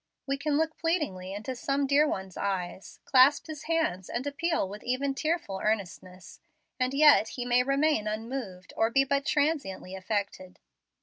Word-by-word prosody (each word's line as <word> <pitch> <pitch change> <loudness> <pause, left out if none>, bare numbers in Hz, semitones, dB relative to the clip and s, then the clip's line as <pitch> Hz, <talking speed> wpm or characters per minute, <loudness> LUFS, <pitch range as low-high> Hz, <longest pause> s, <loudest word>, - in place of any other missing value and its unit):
We 275 - -1
can 285 +1 -1
look 320 0 0
pleadingly 300 - -1
into 215 +6 -5
some 275 +3 -1
dear 285 +2 +4
one's 190 - -4
eyes, 190 -1 -4
clasp 265 +2 +5
his 305 -2 -8
hands 310 - -1
and 240 +3 -3
appeal 315 - -1
with 205 +2 -9
even 270 +3 -1
tearful 310 - -2
earnestness, 185 -4 -4 0.4
and 255 0 +1
yet 285 -5 +6
he 245 +1 -5
may 245 0 +3
remain 275 -3 +1
unmoved, 215 -4 -5
or 225 - +2
be 270 +3 +3
but 275 +1 -1
transiently 280 - -1
affected. 190 -1 -4
255 Hz, 160 wpm, -28 LUFS, 195-290 Hz, 0.4 s, yet